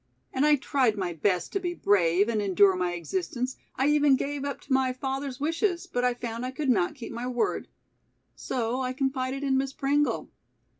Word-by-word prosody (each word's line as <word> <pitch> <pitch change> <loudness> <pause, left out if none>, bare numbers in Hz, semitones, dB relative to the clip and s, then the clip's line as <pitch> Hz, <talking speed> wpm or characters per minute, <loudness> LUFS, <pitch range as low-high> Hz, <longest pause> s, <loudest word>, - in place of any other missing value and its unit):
And 275 +3 +2
I 300 - +6
tried 260 -5 +1
my 180 -3 -2
best 175 +2 0
to 395 - +1
be 350 -1 -3
brave 190 - +3
and 225 -2 0
endure 195 -1 +4
my 180 -1 -1
existence. 255 - -3 0.2
I 265 - +1
even 295 -2 +5
gave 280 +1 -3
up 280 -1 -3
to - - -3
my 260 -1 +2
father's 270 0 -4
wishes, 335 +4 0
but 245 - -2
I 250 -1 +2
found 235 -1 -5
I 255 - -2
could 275 +1 -3
not 190 +2 +1
keep 250 -5 -8
my 240 +1 -4
word. 245 -1 -1 0.7
So 245 +1 -2
I 255 0 -2
confided 265 0 -2
in 265 -1 +2
Miss 270 0 -2
Pringle. 290 +2 0
255 Hz, 195 wpm, -27 LUFS, 225-280 Hz, 0.7 s, I